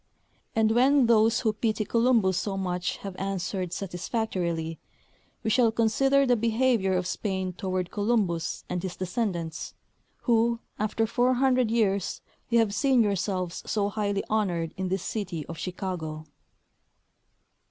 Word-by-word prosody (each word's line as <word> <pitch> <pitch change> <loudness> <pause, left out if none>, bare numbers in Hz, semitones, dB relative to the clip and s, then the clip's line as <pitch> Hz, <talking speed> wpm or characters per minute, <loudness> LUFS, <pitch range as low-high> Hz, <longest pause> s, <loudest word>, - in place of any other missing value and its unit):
And 220 -1 +3
when 260 +3 +5
those 225 -1 +4
who 220 -3 +1
pity 215 0 -1
Columbus 230 -4 +3
so 195 +2 -2
much 180 -1 -2
have 195 -2 -5
answered 190 -2 -3
satisfactorily, 175 -4 -3 0.6
we 220 - 0
shall 235 -1 +4
consider 270 +5 +3
the 250 -2 +4
behavior 230 -3 +2
of 180 - -1
Spain 190 -1 -2
toward 185 -1 -3
Columbus 205 -6 0
and 180 -1 -2
his 185 -1 -5
descendants, 180 -4 -3 0.5
who, 235 -1 +2 0.2
after 215 +1 +1
400 250 +1 +2
years, 200 -4 +1 0.3
you 235 - +3
have 225 -3 +3
seen 260 0 +3
yourselves 190 -3 -1
so 205 -2 0
highly 205 -1 -1
honored 180 -7 0
in 190 0 -2
this 185 0 -1
city 180 -8 -4
of 165 - -8
Chicago. 175 -4 -4
205 Hz, 130 wpm, -27 LUFS, 180-230 Hz, 0.6 s, when